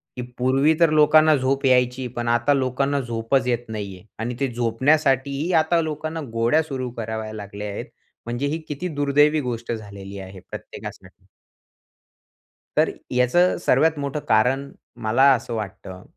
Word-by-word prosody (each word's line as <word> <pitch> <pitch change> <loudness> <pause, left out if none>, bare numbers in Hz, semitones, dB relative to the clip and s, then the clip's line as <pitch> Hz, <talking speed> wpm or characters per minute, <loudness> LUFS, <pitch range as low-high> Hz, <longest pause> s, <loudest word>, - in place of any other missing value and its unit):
की 125 - -4 0.2
पूर्वी 135 +5 +3
तर 170 -2 +5
लोकांना 155 0 +5
झोप 135 +1 0
यायची. 125 0 +2
पण 120 0 -3
आता 120 +4 +3
लोकांना 135 +1 0
झोपच 120 +1 -1
येत 120 -1 -1
नाहीये 100 -4 -6 0.2
आणि 120 +2 -3
ते 140 - +1
झोपण्यासाठीही 135 +5 +1
आता 165 +1 +2
लोकांना 155 +1 -4
गोळ्या 115 +7 +3
सुरू 130 -4 -4
कराव्या 110 -1 -4
लागल्या 105 0 -7
आहेत. - - -5 0.4
म्हणजे 120 +4 -2
ही 150 +3 -1
किती 150 +5 -4
दुर्दैवी 145 +2 +3
गोष्ट 120 -3 -4
झालेली 100 -3 -7
आहे 95 0 -10
प्रत्येकासाठी. - - -10 1.5
तर - - +4 0.2
याचं 125 +9 +3
सर्वात 160 -1 +3
मोठं 140 +1 -3
कारण 130 +6 +2 0.3
मला 110 +5 +2
असं 120 -1 -3
वाटतं, 95 -3 -6
125 Hz, 140 wpm, -23 LUFS, 115-145 Hz, 1.5 s, तर